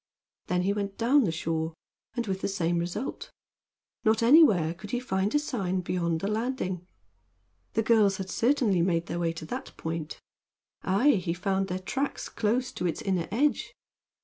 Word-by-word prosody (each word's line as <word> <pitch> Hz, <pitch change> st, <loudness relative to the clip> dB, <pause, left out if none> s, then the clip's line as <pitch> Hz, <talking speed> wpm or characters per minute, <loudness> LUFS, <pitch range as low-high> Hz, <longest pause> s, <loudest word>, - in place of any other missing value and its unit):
Then 180 Hz, 0 st, +1 dB
he 195 Hz, +2 st, +2 dB
went 200 Hz, -1 st, -3 dB
down 255 Hz, +3 st, +4 dB
the 170 Hz, -, 0 dB
shore, 160 Hz, 0 st, -2 dB, 0.4 s
and 240 Hz, -1 st, -1 dB
with 190 Hz, -2 st, -3 dB
the -, -, 0 dB
same 175 Hz, -3 st, 0 dB
result. 175 Hz, +9 st, -4 dB, 0.7 s
Not 220 Hz, 0 st, +3 dB
anywhere 230 Hz, -, +6 dB
could 200 Hz, +4 st, -11 dB
he 245 Hz, -, -1 dB
find 205 Hz, -2 st, -1 dB
a -, -, +7 dB
sign 195 Hz, -11 st, -1 dB
beyond 170 Hz, -2 st, -1 dB
the 195 Hz, -, -1 dB
landing. 210 Hz, -5 st, -2 dB, 0.9 s
The 225 Hz, -, +1 dB
girls 210 Hz, -4 st, +4 dB
had 190 Hz, -, -5 dB
certainly 230 Hz, -7 st, +2 dB
made 170 Hz, -1 st, +1 dB
their 175 Hz, -, -4 dB
way 170 Hz, -1 st, +1 dB
to 160 Hz, -1 st, -7 dB
that -, -, -6 dB
point. 160 Hz, -1 st, -4 dB, 0.6 s
Aye, 220 Hz, +10 st, +3 dB
he 175 Hz, -2 st, -2 dB
found 190 Hz, +1 st, 0 dB
their 180 Hz, -, -2 dB
tracks 270 Hz, +9 st, -3 dB
close 240 Hz, +4 st, 0 dB
to 180 Hz, -, -2 dB
its 165 Hz, -, -3 dB
inner 185 Hz, -4 st, 0 dB
edge. 280 Hz, +8 st, 0 dB
195 Hz, 175 wpm, -28 LUFS, 175-230 Hz, 0.9 s, a